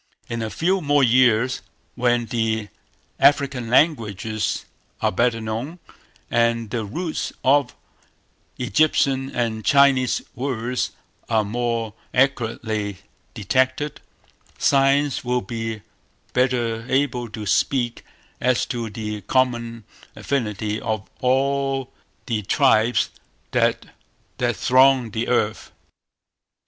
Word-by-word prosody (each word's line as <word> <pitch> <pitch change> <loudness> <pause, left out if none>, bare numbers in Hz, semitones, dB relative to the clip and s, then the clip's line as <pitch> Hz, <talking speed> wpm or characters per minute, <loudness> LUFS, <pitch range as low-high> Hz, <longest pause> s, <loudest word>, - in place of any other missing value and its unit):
In 115 0 -2
a 110 - -2
few 185 - 0
more 145 -2 +3
years, 125 0 +3 0.3
when 120 -1 +1
the 110 -3 -1 0.5
African 140 -4 +3
languages 110 - +1 0.3
are - - +1
better 115 +4 +1
known, 115 +9 -4 0.5
and 115 -2 +1
the 115 -2 -1
roots 160 - -3
of 140 -1 +3 0.8
Egyptian 135 0 +2
and 115 -4 -2
Chinese 140 -2 +4
words 125 -1 -2 0.4
are 110 -2 +2
more 115 0 -2 0.2
accurately 110 -6 0 0.4
detected, 130 +6 0 0.6
Science 140 0 +2
will 125 0 0
be 115 +1 -5 0.5
better 120 -3 +1
able 130 -3 0
to 110 0 -7
speak 120 +4 0 0.4
as 125 0 +2
to 120 -3 -4
the 105 0 -5
common 120 0 0 0.3
affinity 110 -5 -2
of 110 -3 -3
all 135 +1 0 0.3
the 115 -3 -1
tribes 120 +1 +2 0.4
that - - +1 0.7
throng 130 -2 +4
the 110 +3 -2
earth. 110 -3 0
120 Hz, 100 wpm, -22 LUFS, 110-135 Hz, 0.8 s, Chinese